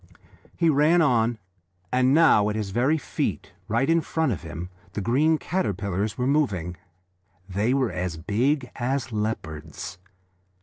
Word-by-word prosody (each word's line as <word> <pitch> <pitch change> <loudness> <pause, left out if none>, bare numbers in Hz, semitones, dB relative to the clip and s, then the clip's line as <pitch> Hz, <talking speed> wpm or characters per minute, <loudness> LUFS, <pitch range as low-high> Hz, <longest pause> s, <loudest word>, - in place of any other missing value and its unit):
He 170 - +2
ran 155 +3 +4
on, 120 -4 +2 0.5
and 130 +1 +3
now 140 -9 +5
at 105 - -2
his 105 -3 -3
very 130 +9 +2
feet, 100 - -3 0.2
right 115 +4 +1
in 165 +1 +3
front 160 -2 0
of 100 - -3
him, 85 +1 -7 0.2
the - - -3
green 140 +10 +2
caterpillars 100 - -2
were 125 - 0
moving. 105 - 0 0.7
They 105 +7 0
were 130 -4 +1
as 90 -2 -3
big 125 - 0
as 130 +1 -1
leopards. 90 -5 -4
115 Hz, 140 wpm, -25 LUFS, 100-140 Hz, 0.7 s, now